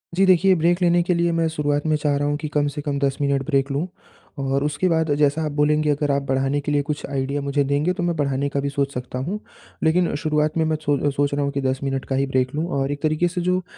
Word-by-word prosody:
जी, 195 +2 +4
देखिए 185 +1 +5
ब्रेक 175 +2 +1
लेने 175 0 +4
के 180 - +1
लिए 170 0 +1
मैं 165 - +2
शुरुआत 145 -1 -1
में 155 - +3
चाह 150 -1 0
रहा 145 0 0
हूँ 145 0 0
कि 155 - -5
कम 145 -1 +2
से 145 - -3
कम 145 -1 -2
10 135 -1 0
मिनट 140 -1 +1
ब्रेक 135 -1 +1
लूँ 145 +6 -1 0.5
और 135 0 0
उसके 150 +5 0
बाद 160 -2 +1
जैसा 145 +1 +2
आप 150 - -2
बोलेंगे, 150 +1 +2
अगर 145 0 +1
आप 140 0 +1
बढ़ाने 135 +1 0
के 150 - -3
लिए 145 -1 +2
कुछ 145 +1 -4
आइडिया 140 +1 -2
मुझे 140 +1 0
देंगे, 145 +6 +1
तो 180 - -3
मैं 175 -1 0
बढ़ाने 140 -2 0
का 140 - -2
भी 140 0 -1
सोच 140 0 -1
सकता 125 0 -5
हूँ। 180 +11 -3 0.4
लेकिन 170 +2 +2
शुरुआत 150 +1 0
में 160 - +3
मैं 160 0 +1
सोदो 145 0 +1
सोच 145 +1 0
रहा 145 0 0
हूँ 140 - -1
कि 140 0 -2
10 130 0 0
मिनट 135 -1 -2
का 135 - -2
ही 135 +1 +1
ब्रेक 130 -1 0
लूँ 155 - -1
और 135 +1 -1
एक 145 0 -5
तरीके 155 +2 +2
से 180 +1 -3
जो 180 +1 +1
अ, - - -10
145 Hz, 280 wpm, -22 LUFS, 140-160 Hz, 0.5 s, देखिए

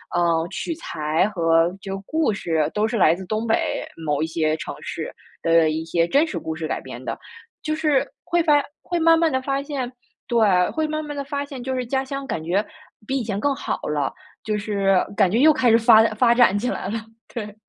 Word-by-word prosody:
呃， 170 -1 +2
取 215 - -3
材 160 - -1
和 165 -3 +3
就 195 -1 -5
故 315 -8 +1
事 160 -5 0
都 210 +1 +1
是 230 - -3
来 165 -5 +5
自 185 +2 -6
东 215 +4 -2
北 225 - 0 0.2
某 150 0 0
一 - - -1
些 155 -1 0
城 - - -6
市 - - -5 0.3
的 165 -1 +4
一 160 +1 -2
些 165 +1 +1
真 285 - +3
实 315 - -4
故 160 - -5
事 160 -1 -4
改 - - -1
编 - - -9
的， - - -4 0.4
就 310 -1 -1
是 305 -4 +1
会 345 0 +1
发 295 -3 +4 0.2
会 350 - -3
慢 330 0 +5
慢 330 -1 +3
地 260 -3 -1
发 275 +1 -1
现， 275 -4 -4 0.4
对， 235 -1 +1 0.3
会 315 -1 -1
慢 310 0 -3
慢 295 -1 -6
地 - - -1
发 280 0 -3
现， 275 -3 -8
就 260 +1 -3
是 255 -1 -2
家 265 +2 -1
乡 275 +1 -5
感 165 - -3
觉 185 +6 0 0.4
比 270 +5 -1
以 240 - -3
前 205 -3 -3
更 285 +6 +1
好 - - -3
了， 145 -3 0 0.3
就 215 -1 -1
是 200 -2 +1 0.2
感 195 -3 +4
觉 225 - +2
又 310 +3 +7
开 250 -4 +2
始 225 - +6
发 230 -1 +7
发 235 +1 +4
展 240 -5 +5
起 245 +5 -1
来 - - -3
了。 225 +2 -2 0.3
对。 210 -3 -6
220 Hz, 240 characters per minute, -22 LUFS, 170-275 Hz, 0.4 s, 又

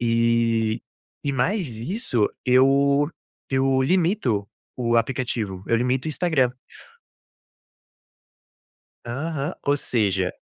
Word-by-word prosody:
E 115 -1 +1 0.4
e 140 - -1
mais 165 - 0
isso 120 - -1 0.2
eu 140 +3 +4 0.4
eu 135 0 +2
limito 160 - +1 0.3
o 120 -2 +1
aplicativo, 115 -5 -1
eu 115 - +3
limito 125 +4 0
o - - -1
Instagram. 150 -6 +1 2.5
Aham, 140 +6 -3
ou 145 0 +3
seja 100 -8 0
125 Hz, 90 wpm, -23 LUFS, 115-140 Hz, 2.5 s, eu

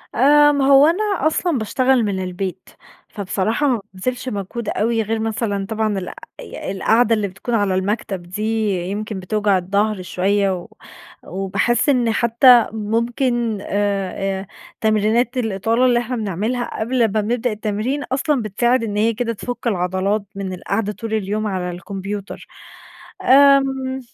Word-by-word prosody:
آآ، 295 +3 +6
ما 285 -2 +1
هو 275 +1 +7
أنا 355 +6 +1 0.2
أصلًا 320 0 0
باشتغل 250 +3 +2
من 190 -2 -2
البيت، 185 0 -5 0.4
فبصراحة 210 +7 -1
ما 245 -6 +1
بابذلش 250 +7 -3
مجهود 210 +1 -4
أوي 225 +1 0
غير 220 +1 -2
مثلًا 215 -3 -2
طبعًا 220 -2 -1
الق 185 -1 -5 0.3
ي - - -6
القعدة 225 +4 +3
اللي 210 -2 -1
بتكون 195 +6 -6
على 200 -3 +1
المكتب 195 0 -2
دي 185 +5 -6 0.5
يمكن 210 0 -4
بتوجع 205 +1 +1
الضَّهر 200 +2 0
شويّة، 195 +2 0
و 175 - -8 0.6
وباحس 195 - 0
إن 245 -4 +2
حتى 235 +1 +5
ممكن 230 +1 -1
آآ 195 -1 -2
آآ 195 - -11 0.3
تمرينات 220 +3 +1
الإطالة 225 +1 +1
اللي 245 -1 +4
إحنا 245 +1 -3
بنعملها 220 +3 -3
قبل 250 +4 -1
ما 235 - +5 0.2
بنبدأ 240 +3 -1
التمرين 215 +6 -2
أصلًا، 270 +1 0
بتساعد 235 +4 +1
إن 205 -2 -3
هي 225 +2 +2
كده 230 +1 -2
تفُك 245 +3 -5
العضلات 190 +1 0
من 195 -1 -4
القعدة 200 +3 -2
طول 225 +1 -6
اليوم 215 0 -1
على 185 -3 -2
الكمبيوتر 195 +3 -6 0.8
آمم، 270 -1 +4
220 Hz, 145 wpm, -20 LUFS, 195-245 Hz, 0.8 s, هو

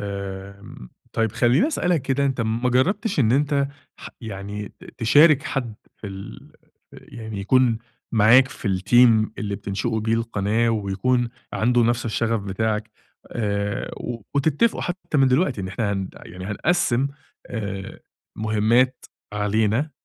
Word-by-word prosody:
آمم 100 -6 -7 0.2
طيب 115 -2 0
خلّيني 120 - +3
أسألك 180 - 0
كده 135 +2 0
أنت 135 -2 -1
ما 115 +2 0
جربتش 190 - +1
إن 115 -3 +3
أنت 140 0 +2 0.3
ح - - -9
يعني 105 -2 -6
ت - - -14
تشارك 145 +5 +6
حد 120 -5 -3 0.2
في - - -9
ال 95 0 -9 0.4
ف - - -13
يعني 110 -3 -7
يكُون 120 +2 +3 0.3
معاك 120 +4 +6
في 120 - -5
الteam 110 +4 +4
اللي 100 -2 -3
بتنشئوا 105 +4 -2
بيه 110 +1 +1
القناة 115 0 0
ويكُون 115 +4 0 0.2
عنده 120 +2 +2
نفس 120 +1 +1
الشغف 115 -1 0
بتاعك 105 +2 -2 0.4
آآ 100 -2 -2
و 115 -2 -6
وتتفقوا 155 +10 +2
حتى 175 -4 -2
من 135 -1 +5
دلوقتي 130 - +1
إن 95 - -4
إحنا 100 +1 -1
هن 95 -2 -3
يعني 90 0 -10
هنقسّم 130 - +1 0.4
آآ 100 -4 -5 0.4
مهمات 110 +4 +2 0.3
علينا 110 +7 +1
115 Hz, 140 wpm, -23 LUFS, 105-130 Hz, 0.4 s, تشارك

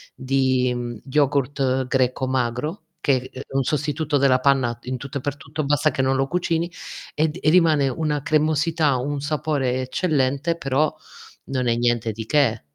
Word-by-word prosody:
di, 130 -1 +1
mhmm, 120 -2 -5
yogurt 135 -2 +1
greco 130 0 +1
magro, 130 - -2 0.2
che, 130 -2 +1
ehm, 130 - -8
è - - -14
un 135 - +2
sostituto 150 +2 0
della 130 -2 +4
panna 130 -3 +2
in 130 +1 -3
tutto 140 +2 -6
e - - -5
per 145 +1 -3
tutto, 145 +2 -5
basta 145 0 +2
che - - -1
non 135 0 +2
lo 135 0 +1
cucini, 170 0 -1 0.4
ed 155 +2 0
e 155 - +3
rimane 160 -5 +4
una 150 +1 -1
cremosità, 155 -1 +2
un 140 +3 -2
sapore 145 -4 -1
eccellente, 140 +2 0
però 140 +1 0 0.5
non 130 -2 -1
è 115 - +2
niente 120 -1 +1
di 110 +1 -6
che. 120 -4 +2
135 Hz, 170 wpm, -23 LUFS, 130-150 Hz, 0.5 s, della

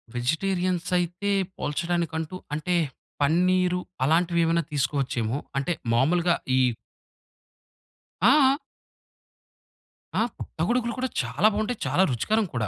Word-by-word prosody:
వెజిటేరియన్సైతే 180 +5 0 0.3
పోల్చడానికంటూ 165 +2 -2 0.2
అంటే, 155 +4 -1 0.5
పన్నీరు 180 +4 +3 0.2
అలాంటివేవన్నా 170 +2 +2
తీసుకోవచ్చోమో. 135 -4 -1 0.2
అంటే 140 +6 0 0.2
మామూలుగా 170 +7 +3 0.2
ఈ - - +4 1.6
ఆ! 270 +5 +5 1.6
ఆ! - - +3 0.2
పుట్టగొడుగులు 235 +8 -1
కూడా 255 0 -1
చాలా 215 - +2
బాగుంటాయి, 215 +2 -2
చాలా 145 +8 +3
రుచికరం 215 - +1
కూడా. 115 -4 -1
175 Hz, 85 wpm, -26 LUFS, 150-185 Hz, 1.6 s, ఆ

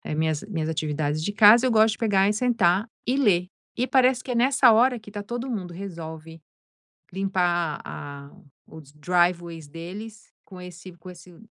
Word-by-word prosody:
minhas 155 -1 -1
minhas 160 -5 -3
atividades 155 -1 -2
de 205 - -3
casa, 220 +4 +7
eu 250 - +2
gosto 220 0 +4
de - - -10
pegar 200 -3 +2
e - - +1
sentar 215 -4 +1 0.2
e 255 +3 0
ler 180 -9 +2 0.3
e 250 +2 0
parece 255 -1 +2
que 255 - -6
é - - -2
nessa 255 0 +4
hora 245 +2 +3
que 215 -1 -14
está 205 0 -7
todo 240 +4 -5
mundo 185 -7 -5
resolve, 165 -3 -9 0.7
limpar 175 -4 -1
a 140 0 -9 0.4
os 155 -3 -14
driveways 170 0 -1
deles 200 +8 -10
com 185 -2 -12
esse 180 +1 -11
com 180 +1 -13
esse 175 0 -16
185 Hz, 170 wpm, -24 LUFS, 165-225 Hz, 0.7 s, casa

